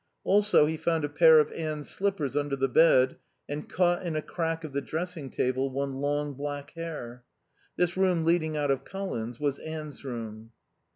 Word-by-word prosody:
Also 205 -5 +5
he 160 +1 -1
found 165 -1 0
a - - -4
pair 160 +2 +7
of 150 - +2
Anne's 155 -2 -4
slippers 190 -9 -1
under 145 -1 0
the 135 0 +1
bed, 130 -2 +5 0.3
and, 145 +1 -5
caught 175 0 +2
in 170 -3 -3
a 155 - 0
crack 165 -1 -2
of 155 -3 -7
the 140 - 0
dressing 160 -1 -4
table, 130 +2 0
one 135 +1 -2
long 145 0 -1
black 145 +1 -5
hair. 150 -8 -7 0.5
This 180 0 +1
room 185 -4 +2
leading 160 -2 +2
out 145 -1 +1
of 135 - -1
Colin's 125 - -5
was 145 -2 -1
Anne's 155 -3 -7
room. 115 -3 -7
150 Hz, 180 wpm, -28 LUFS, 140-165 Hz, 0.5 s, pair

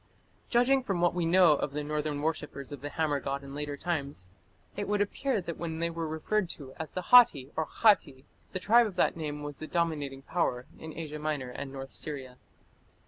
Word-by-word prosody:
Judging 250 +3 +4
from 195 -8 -2
what 175 0 +3
we 175 -2 0
know 180 -1 +6
of 145 -1 -2
the 150 0 -2
northern 150 -1 -2
worshippers 150 -4 -3
of 145 -3 -7
the 145 - -4
hammer 150 -2 0
god 140 +1 -3
in 140 0 -9
later 145 0 -4
times, 140 - -3 0.4
it 205 0 -3
would 205 0 +1
appear 225 +4 0
that 170 -3 -6
when 165 -2 -3
they 170 +1 -1
were 165 -1 -3
referred 170 +5 -1
to 135 -5 -7
as 160 -2 -5
the 185 - -3
Hatti 150 - +7
or 160 - -1
Khatti, 145 -11 +3 0.3
the 185 - -3
tribe 230 +4 +5
of 200 - -8
that 180 - +2
name 150 -2 -4
was 145 -1 -6
the 155 - -6
dominating 150 -6 -1
power 130 -7 -1
in 160 -1 -8
Asia 155 -2 -5
Minor 150 -4 -2
and 135 +2 -6
north 135 0 -7
Syria. 130 -4 -5
155 Hz, 205 wpm, -30 LUFS, 140-175 Hz, 0.4 s, Hatti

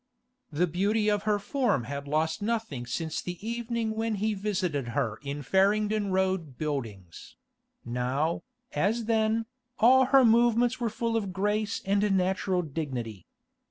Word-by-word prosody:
The 160 +4 +2
beauty 205 +5 +1
of 205 -1 +1
her 210 - +3
form 240 - 0
had 140 +2 -6
lost 160 +5 0
nothing 210 - -2
since 160 +5 -3
the 180 0 -5
evening 235 -1 -2
when 225 0 -1
he 215 +2 0
visited 185 - -2
her 110 0 -1
in 145 0 -5
Farringdon 205 +5 +2
Road 185 -7 0
Buildings; 115 - -5 0.5
now, 125 +7 -1 0.3
as 215 +9 0
then, 220 0 +1 0.3
all 255 +3 +6
her 270 0 +5
movements 240 +2 +3
were 235 -2 0
full 230 +1 -2
of 205 -4 -1
grace 210 +2 -1
and 200 0 +2
natural 185 0 0
dignity. 130 - -5
195 Hz, 140 wpm, -28 LUFS, 150-220 Hz, 0.5 s, all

